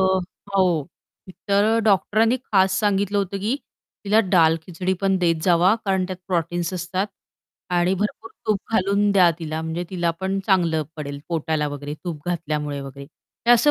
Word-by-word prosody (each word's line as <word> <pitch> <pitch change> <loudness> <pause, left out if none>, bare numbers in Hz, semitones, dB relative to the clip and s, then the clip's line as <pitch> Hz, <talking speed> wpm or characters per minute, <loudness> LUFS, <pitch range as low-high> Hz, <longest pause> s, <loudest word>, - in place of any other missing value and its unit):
अ, 190 - +4 0.5
हो. 180 -5 +3 0.7
तर 210 +3 +3
डॉक्टरांनी 215 +4 +3
खास 190 -1 +2
सांगितलं 205 -1 +1
होतं, 200 0 -2
की 220 +7 -1 0.5
तिला 215 +3 +4
दाल-खिचडी 170 +1 +2
पण 195 -1 +2
देत 165 -3 +1
जावा 180 +3 +4
कारण 190 -2 +1
त्यात 185 -1 -5
प्रोटीन्स 175 0 -1
असतात. 185 +3 -2 0.6
आणि 175 +1 +2
भरपूर 210 +3 -3 0.2
तूप 210 -2 +2
घालून 200 0 +2
द्या 180 -3 +6
तिला, 160 -1 -4
म्हणजे 165 +2 -3
तिला 175 -2 0
पण 190 +1 -1
चांगलं 170 -5 +2
पडेल 140 -2 -5
पोटाला 160 -2 -1
वगैरे, 145 +1 -6
तूप 160 -3 -6
घातल्यामुळे 150 -4 -2
वगैरे. 140 0 -9 0.4
तर - - +5
असं 270 +5 +5
180 Hz, 155 wpm, -23 LUFS, 160-200 Hz, 0.7 s, द्या